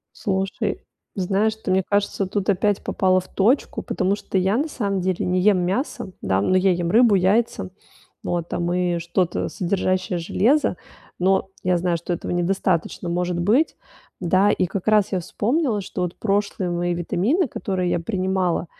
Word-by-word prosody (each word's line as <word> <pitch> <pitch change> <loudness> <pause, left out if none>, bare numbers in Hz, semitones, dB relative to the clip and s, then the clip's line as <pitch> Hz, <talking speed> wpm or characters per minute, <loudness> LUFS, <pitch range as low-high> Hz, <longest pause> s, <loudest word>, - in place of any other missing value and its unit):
Слушай, 190 -1 -2 0.3
знаешь, 200 +3 0
ты, 220 - -5
мне 190 +1 +3
кажется, 200 0 0
тут 195 0 -3
опять 200 +1 +1
попала 185 -1 +2
в 185 - -14
точку. 230 +8 +1
Потому 185 +2 0
что 200 - -5
я 190 +3 +2
на 295 +5 0
самом 200 -9 -2
деле 185 -1 -1
не 180 0 +1
ем 200 0 +4
мясо, 190 - -2
да. 95 0 +1
Но 185 - +2
я 190 +1 +4
ем 175 -1 -1
рыбу, 230 +1 +5
яйца, 190 - +1 0.5
вот, 170 -1 -2
там, 175 0 -2
и 180 -1 0
что-то 170 +1 -1
содержащее 185 0 -1
железо. 230 - +2 0.4
Но, 190 +1 +2
я 180 -1 +2
знаю, 175 0 0
что 170 +2 -4
этого 175 - -3
недостаточно 175 -1 0
может 175 0 -1
быть, 220 - +2 0.4
да. 185 +3 +3
И 185 - +1
как 185 +3 -4
раз 210 -2 +3
я 185 - +1
вспомнила, 230 - 0
что 185 -1 -5
вот 180 -1 -3
прошлые 200 -3 -1
мои 175 0 -1
витамины, 205 - +1
которые 185 -4 -2
я - - 0
принимала, 185 -2 -1
185 Hz, 170 wpm, -22 LUFS, 175-205 Hz, 0.5 s, рыбу